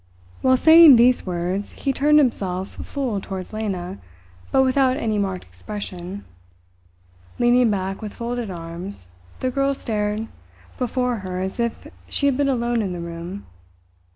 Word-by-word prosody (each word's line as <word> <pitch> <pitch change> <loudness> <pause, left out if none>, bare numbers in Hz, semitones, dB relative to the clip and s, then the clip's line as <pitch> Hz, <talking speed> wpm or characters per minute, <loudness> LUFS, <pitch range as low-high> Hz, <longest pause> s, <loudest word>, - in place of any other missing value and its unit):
While 260 0 +4
saying 320 -1 +9
these 245 -2 +4
words 180 +3 -2
he 275 - -2
turned 300 +3 +4
himself 190 -9 +1
full 250 -8 -3
towards 190 +1 -7
Lena, 195 -4 -4 0.5
but 265 - +4
without 260 0 +2
any 220 -6 -1
marked 190 -2 -2
expression. 200 -2 -7 1.1
Leaning 240 0 +4
back 195 -1 -2
with 210 -2 -7
folded 240 -1 -3
arms, 170 - -8 0.3
the 255 - 0
girl 275 +1 +1
stared 210 -2 -2 0.5
before 250 -1 0
her 185 -2 -5
as 190 +4 -4
if 235 -1 -2 0.2
she 280 - -1
had 280 -2 +3
been 280 +1 +1
alone 240 -2 0
in 190 -4 -2
the 175 - -5
room. 170 +3 -7
215 Hz, 145 wpm, -22 LUFS, 190-255 Hz, 1.1 s, saying